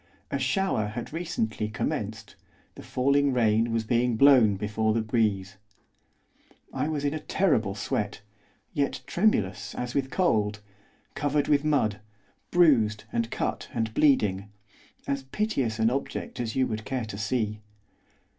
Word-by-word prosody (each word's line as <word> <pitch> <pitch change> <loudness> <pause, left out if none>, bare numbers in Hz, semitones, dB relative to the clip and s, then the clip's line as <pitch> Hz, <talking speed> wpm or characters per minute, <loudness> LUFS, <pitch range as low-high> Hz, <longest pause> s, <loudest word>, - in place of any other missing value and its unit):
A - - -1
shower 190 - 0
had 115 +6 -6
recently 135 -11 -2
commenced, 110 - -4 0.4
the - - -11
falling 140 +2 +2
rain 115 -1 +2
was 115 -1 0
being 120 +1 +1
blown 120 -5 +6
before 110 +2 0
the 115 - +2
breeze. 105 -3 0 1.2
I - - -1
was 150 -2 -2
in 145 - +1
a 155 - -3
terrible 145 - +1
sweat, 105 0 -3 0.5
yet 140 -3 -1
tremulous 105 - 0
as 125 0 -4
with 135 -1 0
cold; 110 - +1 0.5
covered 145 0 0
with 145 -1 +3
mud; 125 -9 +1 0.5
bruised, 115 -12 +4
and 115 -1 0
cut, - - -3
and 110 -2 -1
bleeding, 105 -10 +2 0.6
as 140 0 -1
piteous 135 - -1
an 110 +1 +2
object 135 0 -4
as 115 -2 -3
you 130 - +3
would 110 -2 -4
care 130 -1 -3
to 105 -2 -7
see. 110 -1 -1
115 Hz, 140 wpm, -27 LUFS, 110-140 Hz, 1.2 s, blown